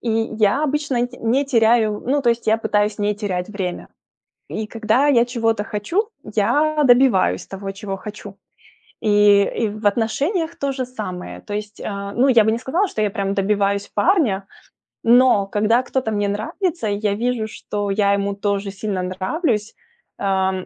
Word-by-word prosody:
И 235 - -2 0.3
я 215 +8 +3
обычно 280 -4 0
т 245 - -14
не 250 +5 +1
теряю, 225 -4 +2
ну, 280 +2 +1
то 240 - +4
есть 235 -1 -2
я 220 +1 +4
пытаюсь 210 -1 0
не 205 0 0
терять 190 -3 -3
время. 190 -4 -5 0.6
И 215 0 -4
когда 225 +5 +1
я 240 -4 +5
чего-то 225 -3 -1
хочу, 335 - -2 0.2
я 295 +9 +1
добиваюсь 245 - +4
того, 195 0 -6
чего 195 0 -5
хочу. 205 0 -9 0.7
И 205 -1 +5 0.2
и 220 - +2
в 215 0 -8
отношениях 290 - 0
то 280 -1 -2
же 260 -1 -3
самое. 205 -8 -7
То 205 - -8
есть, 210 0 -5
э, 200 -1 -5
ну 255 +3 +3
я 235 -4 +6
бы 220 - +2
не 230 - 0
сказала, 350 +11 0
что 215 - -4
я 210 - +2
прям 195 0 -2
добиваюсь 200 0 0
парня, 230 - +2 0.6
но 235 -4 +5
когда 215 +4 +2
кто-то 255 -3 -2
мне 205 -1 0
нравится, 230 - -2
и 205 - -1
я 210 -1 0
вижу, 235 -1 -1
что 205 -1 -4
я 200 0 +2
ему 200 0 -1
тоже 200 -1 -2
сильно 195 -2 -3
нравлюсь, 210 - -2 0.4
ам, 190 -1 0
215 Hz, 170 wpm, -20 LUFS, 200-245 Hz, 0.7 s, я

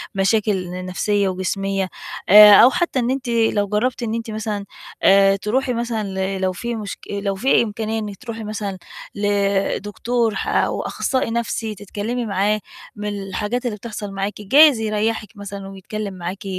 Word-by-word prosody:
مشاكل 195 -1 +1
ن 180 +1 -6
نفْسيّة 200 +2 0
وجسميّة، 190 +1 -2 0.4
آآ، 210 +1 +10
أو 235 +5 +9
حتى 345 -2 0
إن 245 0 0
أنتِ 265 -2 -3
لو 225 -3 +2
جرّبتِ 230 +5 -1
إن 220 -1 -2
أنتِ 230 -1 -4
مثلًا 215 -2 -3 0.4
آآ 195 0 +6
تروحي 250 +6 -1
مثلًا 235 -2 -2 0.3
ل - - -6
لو 185 0 +1
في 235 +5 -4
مشك 210 -3 -6
لو 200 -1 -2
في 235 +5 +3
إمكانية 220 0 -3
إنِك 205 -2 -6
تروحي 230 0 -7
مثلًا 210 -2 -4 0.4
لدكتور 205 +3 0
ح - - -3
أو - - +1
أخصّائي 260 -4 -1
نَفْسي 225 -1 -2
تتكلمي 210 +5 -4
معاه 205 +1 +1 0.4
من 210 0 -4
الحاجات 210 +6 -3
اللي 220 -4 -2
بتحصل 210 -1 -7
معاكِ 195 +2 -4
جايز 280 +4 +6
يريّحك 215 0 -1
مثلًا 200 -1 -7
ويتكلم 195 +1 -6
معاكِ، 185 +2 -6
210 Hz, 160 wpm, -21 LUFS, 195-230 Hz, 0.4 s, آآ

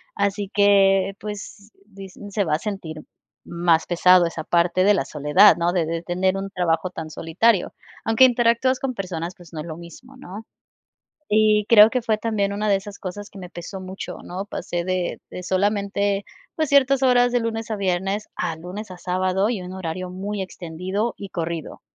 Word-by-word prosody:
así 200 0 -1
que, 195 -1 +4
pues, 210 0 -8
di 195 -2 -11
se 205 +2 -4
va 155 - -1
a 155 - +1
sentir 190 -7 -5 0.5
más 170 -1 +1
pesado 180 0 +5
esa 165 -1 -5
parte 175 +2 +2
de 205 - +6
la 175 - +1
soledad, 155 +7 +5
¿no?, 175 +1 0
de 170 -3 +1
de 165 +1 -3
tener 185 +2 0
un 195 0 -4
trabajo 180 -2 0
tan 160 -3 -7
solitario, 175 +7 +1 0.3
aunque 225 +3 +4
interactúas 245 +1 +2
con 265 -2 -2
personas, 180 -4 -5
pues, 175 -2 -16
no 155 - -7
es 155 - -5
lo 160 - -6
mismo, 170 -2 -13
¿no?, 205 +5 -10 0.9
y 215 -1 +3
creo 215 -1 +8
que 255 - 0
fue 225 -2 0
también 210 -3 -1
una 210 0 -1
de 195 - +4
esas 200 +1 -8
cosas 200 +2 -7
que 195 - -13
me 180 -2 -9
pesó 185 +2 -8
mucho, 185 +1 -7
¿no?, 190 +3 -6
pasé 175 -3 -4
de 185 -1 -2
de 180 - -8
solamente, 200 +1 0 0.3
pues, 315 -3 -1
ciertas 275 -1 +4
horas 245 -1 +4
de 245 - +2
lunes 225 0 -3
a 215 - -1
viernes, 195 +2 -1
a 165 - -3
lunes 185 +5 -8
a 180 - -8
sábado 185 +3 0
y 220 -6 -2
un 180 +1 -8
horario 185 0 -5
muy 195 +2 -5
extendido 185 +5 -3
y 200 - -7
corrido, 170 -3 -5
195 Hz, 190 wpm, -22 LUFS, 175-210 Hz, 0.9 s, creo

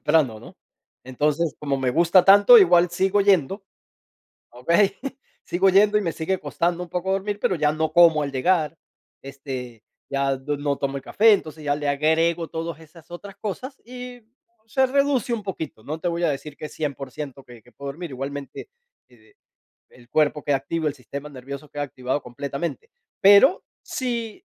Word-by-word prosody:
temprano, 130 -9 +2
¿no? - - -14 0.5
Entonces, 150 +5 -1
como 140 -2 -2
me 130 -1 0
gusta 170 +5 +4
tanto, 205 +5 +8
igual 175 -3 +5
sigo 190 +3 +1
yendo, 195 0 +2 0.9
¿okey? 170 +11 +2 0.5
Sigo 185 +2 +2
yendo, 205 +2 +5
y - - -1
me 170 -5 -2
sigue 175 +4 -2
costando 170 +4 -2
un - - -15
poco 180 +2 -3
dormir, 200 +1 -2
pero 185 - +1
ya 150 -1 +1
no 155 0 -2
como 165 -3 +6
al 140 - -3
llegar, 155 +3 0 0.4
este, 130 -4 -8 0.3
ya 135 0 0
du 145 +2 -4
no 145 0 -1
tomo 140 0 -3
el 135 - -6
café. 220 +1 +4
Entonces 155 -6 -2
ya 145 -1 +1
le 145 -1 -3
agrego 160 +3 +1
todas 165 -1 -5
esas 160 +1 -17
otras 195 +3 -9
cosas, 250 +7 -6
y 250 0 -9 0.5
se 265 +5 +2
reduce 270 -3 +1
un 215 - -5
poquito, 160 - -6
no 155 +7 -5
te 175 - -6
voy 170 0 -1
a - - +3
decir 145 +1 -6
que 155 - -6
es - - -13
100% 140 -1 -6
que 120 -2 -15
que 120 - -22
puedo 140 0 -8
dormir, 165 +4 -7
igualmente 140 - -7 0.4
e 110 -3 -24 0.6
el 120 -1 -20
cuerpo 150 -1 +1
queda 145 -2 +1
activo, 160 +3 -3
el 145 - -1
sistema 140 +3 -8
nervioso 140 +2 -9
queda 145 - -4
activado 130 0 -3
completamente. 140 - -5 0.3
Pero, 200 - +6 0.2
si 235 -4 -4
160 Hz, 175 wpm, -23 LUFS, 140-190 Hz, 0.9 s, tanto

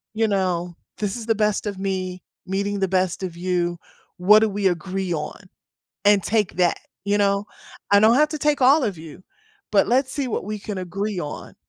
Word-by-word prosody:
you 225 0 +2
know, 180 -3 -1 0.2
"This 205 0 -2
is 225 - -7
the 225 - +2
best 210 0 0
of 200 -2 -4
me, 185 -2 -3 0.2
meeting 200 +1 -2
the 190 - +1
best 185 0 0
of 175 -2 -4
you. 175 -1 -1 0.4
What 210 +4 +6
do 220 -1 +2
we 200 -1 0
agree 185 +1 -2
on." 150 +5 -4 0.7
And 205 -2 +5
take 215 -1 0
that, 180 -2 +2 0.3
you 205 +1 +1
know, 200 0 +1 0.4
"I 200 - +7
don't 220 +2 +6
have 300 +1 +4
to 310 - -4
take 295 0 +1
all 280 +4 +6
of 195 -6 -2
you, 160 +3 -11 0.5
but 200 - +4
let's 260 +2 +2
see 275 -4 -2
what 215 - -2
we 210 +1 -4
can 200 -1 -5
agree 195 +2 -3
on, 145 - -7
200 Hz, 200 wpm, -23 LUFS, 185-215 Hz, 0.7 s, I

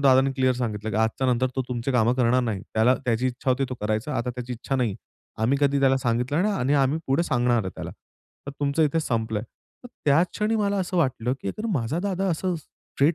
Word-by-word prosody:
दादांनी 135 -1 +5
क्लिअर 130 -1 +2
सांगितलं, 110 -3 -3
की - - -2
आजच्या 110 +4 +1
नंतर 125 0 +2
तो 130 - +1
तुमची 125 +2 -2
कामं 120 -1 +3
करणार 125 0 +3
नाही. 105 -5 -2
त्याला 115 +4 +4
त्याची 120 +1 +1
इच्छा 130 +1 -2
होती 130 +2 +2
तो 130 - -4
करायचा 110 +7 -1
आता 120 +1 -1
त्याची 125 0 -6
इच्छा 125 +3 -3
नाही. 120 -6 0 0.5
आम्ही 130 +5 +2
कधी 140 -1 +3
त्याला 135 -1 +4
सांगितलं 125 +5 0
नाही 210 +1 +1
आणि 140 -2 +1
आम्ही 140 +2 +2
पुढे 135 +5 +2
सांगणार 120 -6 +1
आहे 95 - -4
त्याला. - - -6 0.6
तर - - -3
तुमचं 145 +2 +2
इथे 155 +2 +2
संपलंय. 110 -6 -1
तर 185 - -17 0.2
त्या 145 +3 +5
क्षणी 215 +5 -1
मला 205 -1 +1
असं 185 0 -2
वाटलं, 125 -6 +1
की - - -4
अगर 215 - -4
माझा 130 +4 -1
दादा 195 0 -1
असं 180 +2 -1
स्ट्रेट 150 0 -1
130 Hz, 220 wpm, -25 LUFS, 120-145 Hz, 0.6 s, दादांनी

